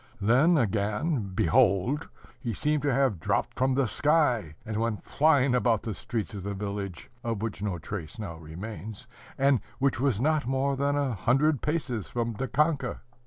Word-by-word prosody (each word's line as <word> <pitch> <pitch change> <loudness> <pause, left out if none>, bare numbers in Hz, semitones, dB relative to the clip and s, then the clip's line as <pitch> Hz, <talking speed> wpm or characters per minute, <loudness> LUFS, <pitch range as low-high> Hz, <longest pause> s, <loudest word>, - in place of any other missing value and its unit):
Then, 130 - +4
again, 105 - 0
behold, 120 - +2 0.3
he 115 -5 -3
seemed 150 +5 +1
to 145 0 +1
have 130 -8 +2
dropped - - -1
from 130 0 +2
the 135 -2 +2
sky, 125 - +2
and 110 -1 -3
went 115 -1 -1
flying 140 -4 +3
about 120 -3 +2
the 110 - -3
streets 110 +4 -4
of 100 - -5
the 100 +2 -4
village, 100 -2 -5
of 115 -3 -2
which 100 -4 -4
no 100 -4 -2
trace 85 +1 -6
now 100 -7 -6
remains, 100 +7 -8 0.3
and 135 -2 +4 0.2
which 135 -1 +1
was 130 -6 +1
not 150 0 +1
more 135 +1 +1
than 140 +1 +1
a 140 -3 0
hundred 135 - +2
paces 145 - -2
from 120 -1 -2
Dikanka. 135 +3 0
120 Hz, 165 wpm, -28 LUFS, 105-140 Hz, 0.3 s, Then